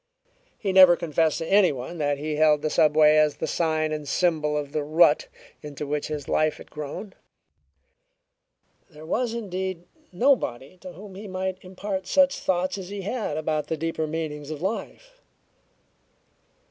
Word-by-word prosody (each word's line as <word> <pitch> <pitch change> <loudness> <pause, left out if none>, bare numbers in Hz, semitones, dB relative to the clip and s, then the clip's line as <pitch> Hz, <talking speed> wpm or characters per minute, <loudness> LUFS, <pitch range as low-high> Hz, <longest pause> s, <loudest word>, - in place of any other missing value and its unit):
He 195 - -2
never 185 -2 +8
confessed 160 -2 0
to 165 - -4
anyone 175 -6 +2
that 145 -1 0
he 150 +1 -3
held 150 -1 +4
the 155 - -1
subway 155 0 +5
as 155 -1 +3
the - - -3
sign 155 -2 0
and 150 -1 -4
symbol 150 -1 +1
of 145 -1 -4
the 155 -1 -1
rut 165 - +4 0.3
into 150 0 -7
which 145 +1 -2
his 150 -3 -5
life 155 0 +1
had - - -14
grown. 150 +7 -7 1.8
There 155 -2 -13
was, 235 +7 -1
indeed, 190 -5 -4 0.3
nobody 185 - 0
to 180 0 -10
whom 195 +3 -11
he 205 +3 -9
might 185 0 -3
impart 190 0 -5
such 275 +3 +3
thoughts 185 +1 -1
as 185 -1 -8
he 200 -1 -6
had 210 -7 -3
about 155 -1 -2
the 160 - -2
deeper 160 0 -2
meanings 150 -2 -5
of 155 -2 -5
life. - - -5
165 Hz, 160 wpm, -25 LUFS, 150-190 Hz, 1.8 s, never